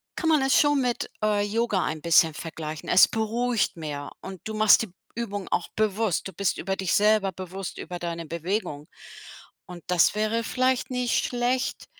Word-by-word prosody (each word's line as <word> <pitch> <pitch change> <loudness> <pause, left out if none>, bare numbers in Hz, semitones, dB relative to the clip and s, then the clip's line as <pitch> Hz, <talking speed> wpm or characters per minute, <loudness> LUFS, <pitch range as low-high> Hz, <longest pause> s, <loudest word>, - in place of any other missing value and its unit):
kann 330 - -2
man 305 -3 +4
es 270 0 +4
schon 290 -2 +3
mit, 245 -1 -1
äh, 210 -1 +2
Yoga 210 -2 0
ein 155 - -4
bisschen 165 0 +4
vergleichen. 155 -1 -7
Es 180 - +7
beruhigt 225 -1 -1
mehr, 145 -3 -6
und 190 -2 -9
du 220 0 -4
machst 215 0 +6
die 220 - -7 0.3
Übung 205 -4 -4
auch 175 - -1
bewusst. 215 -3 0
Du 190 - -10
bist 200 -2 -1
über 195 +2 -2
dich 190 -2 -1
selber 210 -2 +3
bewusst, 185 +1 -7
über 175 +1 -6
deine 170 -1 -4
Bewegung. 165 -2 -3 0.8
Und 175 -1 -10
das 180 +2 +3
wäre 215 +2 0
vielleicht 255 +1 0
nicht 250 -1 0
schlecht 245 +1 -1
205 Hz, 175 wpm, -25 LUFS, 175-230 Hz, 0.8 s, Es